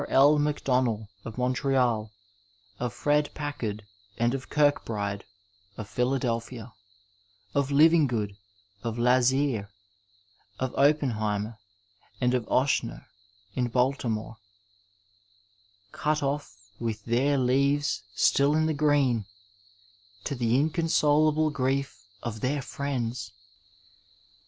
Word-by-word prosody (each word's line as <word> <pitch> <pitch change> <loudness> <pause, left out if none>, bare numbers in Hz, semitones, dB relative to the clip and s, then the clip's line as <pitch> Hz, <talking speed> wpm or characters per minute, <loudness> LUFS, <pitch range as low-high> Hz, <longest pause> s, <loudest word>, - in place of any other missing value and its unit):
L. 145 +3 +5
MacDonnell, 130 -7 0 0.2
of 115 +1 -7
Montreal; 125 -4 +1 0.7
of 125 -1 -2
Fred 145 +4 +1
Packard 115 -8 -4 0.3
and 120 +1 +1
of 130 -1 -4
Eirk 145 -1 +3
bride, 100 -2 -3 0.5
of 110 - -6
Philadelphia; 125 -2 -2 0.8
of 140 -1 +1
Livingood, 140 -9 +3 0.5
of 115 +1 -4
Lazear, 125 -2 +2 0.9
of 130 -1 -2
Oppen 145 -1 +3
heimer, 105 +1 -2 0.6
and 125 -1 +2
of 125 -3 -1
Oechsner, 130 -3 0 0.5
in 125 +2 0
Baltimore 120 -3 -1 0.8
— 100 0 -36
cut 150 0 +1
off 140 -2 -3 0.2
with 115 -2 -4
their 130 +5 +2
leaves 140 +3 +1
still 140 +2 +3
in 155 0 +2
the 160 - +1
green, 140 -8 +2 1.0
to - - -3
the 120 -3 +1
inconsolable 155 -1 +2
grief 135 0 -1 0.2
of 110 -2 -5
their 140 +2 -1
friends! 125 -7 -3
130 Hz, 105 wpm, -27 LUFS, 115-145 Hz, 1.0 s, L